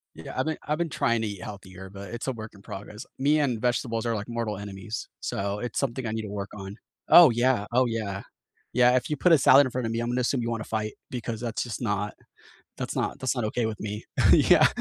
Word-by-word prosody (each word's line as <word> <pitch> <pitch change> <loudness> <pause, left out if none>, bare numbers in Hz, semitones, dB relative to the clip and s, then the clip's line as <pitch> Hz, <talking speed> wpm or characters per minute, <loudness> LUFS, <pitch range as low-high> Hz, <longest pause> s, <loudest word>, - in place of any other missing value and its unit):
Yeah, - - -9
I've - - +1
been 160 - -1
I've 150 +1 +1
been 170 -2 -1
trying 115 -4 +1
to - - 0
eat 100 -3 -6
healthier, 95 -2 -9
but 100 -1 -9
it's 120 +3 -5
a - - +1
work 110 -2 -7
in 100 - -16
progress. 105 +4 -8
Me 145 +3 +3
and 125 -6 +1
vegetables 120 -1 0
are 115 - +1
like 105 +3 -5
mortal 115 -3 -2
enemies, 100 +1 -6
so 100 +1 -2
it's 120 -1 -3
something 130 -2 -2
I 110 - -2
need 110 0 -2
to 105 - -6
work 100 -1 -4
on. 100 0 -7 0.3
Oh, 170 -7 +10
yeah, 120 -2 +2
oh, 130 +1 +4
yeah. 105 -4 -3 0.5
Yeah. 125 +1 +5
If 125 - 0
you 150 - 0
put 180 +6 +3
a 160 - +7
salad 135 +1 +7
in - - -3
front 125 -2 -2
of 115 - -2
me, 115 - -1
I'm 120 - -2
gonna 125 +1 0
assume 125 +1 +1
you 115 - -2
wanna 115 -2 -3
fight 110 -1 -3 0.2
because 115 -2 -4
that's 115 -2 -2
just 120 -2 -5
not 105 -2 -1 0.6
that's - - -4
not - - -1
that's 130 0 0
not 120 - -1
okay 115 +2 -1
with 110 -2 -3
me. 105 0 -5 0.3
Yeah. - - +6
115 Hz, 250 wpm, -27 LUFS, 105-125 Hz, 0.6 s, Oh